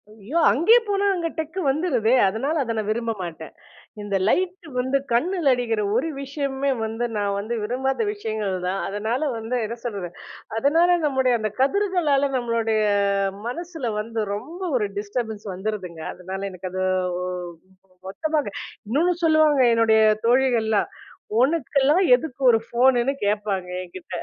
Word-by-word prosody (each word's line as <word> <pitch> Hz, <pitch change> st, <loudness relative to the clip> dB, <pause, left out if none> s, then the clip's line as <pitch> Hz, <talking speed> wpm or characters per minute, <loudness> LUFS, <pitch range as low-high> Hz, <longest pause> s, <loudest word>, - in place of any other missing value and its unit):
ஐயோ! 220 Hz, +8 st, -5 dB
அங்கேயே 340 Hz, -, +5 dB
போனா 400 Hz, 0 st, +1 dB
அங்க 340 Hz, -2 st, -1 dB
டெக் 320 Hz, +3 st, -4 dB
வந்துருதே. 270 Hz, -6 st, +1 dB
அதனால 260 Hz, +11 st, -1 dB
அத 230 Hz, -2 st, -3 dB
நான் 215 Hz, -1 st, -2 dB
விரும்ப 230 Hz, +1 st, -1 dB
மாட்டேன். 160 Hz, -2 st, -7 dB, 0.5 s
இந்த 205 Hz, -1 st, -3 dB
லைட் 365 Hz, -, 0 dB
வந்து 260 Hz, +2 st, +1 dB
கண்ணுல 315 Hz, +4 st, +2 dB
அடிக்கிற 230 Hz, -3 st, -1 dB
ஒரு 255 Hz, +7 st, +1 dB
விஷயமே 275 Hz, 0 st, -2 dB
வந்து, 225 Hz, +2 st, -2 dB
நான் 200 Hz, -1 st, 0 dB
வந்து 220 Hz, +4 st, -3 dB
விரும்பாத 265 Hz, -, -1 dB
விஷயங்கள்தான். 195 Hz, -, -3 dB
அதனால 220 Hz, +6 st, -2 dB, 0.2 s
வந்து 225 Hz, +3 st, -2 dB
என்ன 230 Hz, +2 st, -5 dB
சொல்றது, 200 Hz, -7 st, -4 dB, 0.5 s
அதனால 335 Hz, +7 st, +4 dB
நம்முடைய 265 Hz, -3 st, +2 dB
அந்த 215 Hz, -1 st, -2 dB
கதிர்களால 295 Hz, -3 st, +2 dB
நம்ளுடைய 230 Hz, -2 st, 0 dB, 0.7 s
மனசுல 320 Hz, -3 st, -4 dB
வந்து 225 Hz, +1 st, -3 dB
ரொம்ப 305 Hz, -, -8 dB, 0.2 s
ஒரு 210 Hz, -3 st, 0 dB
டிஸ்டர்பன்ஸ் 215 Hz, 0 st, -4 dB
வந்துருதுங்க. 185 Hz, -4 st, -5 dB
அதனால 190 Hz, +2 st, -7 dB
எனக்கு 185 Hz, 0 st, -7 dB
அது 185 Hz, 0 st, -3 dB, 0.4 s
ஒ -, -, -2 dB, 0.8 s
மொத்தமாங்க 300 Hz, +6 st, -1 dB, 0.4 s
இன்னொன்னு 325 Hz, +10 st, +2 dB
சொல்லுவாங்க 310 Hz, -3 st, +4 dB
என்னுடைய 220 Hz, -1 st, +4 dB, 0.3 s
தோழிகள்லாம். 235 Hz, -4 st, +2 dB, 0.5 s
உனக்கெல்லாம் 290 Hz, +4 st, +2 dB
எதுக்கு 255 Hz, +1 st, 0 dB
ஒரு 235 Hz, -2 st, +6 dB
ஃபோனுன்னு 245 Hz, +2 st, +3 dB
கேப்பாங்க 205 Hz, -2 st, -1 dB
என்கிட்ட. 180 Hz, 0 st, -10 dB
240 Hz, 130 wpm, -23 LUFS, 215-290 Hz, 0.8 s, ஒரு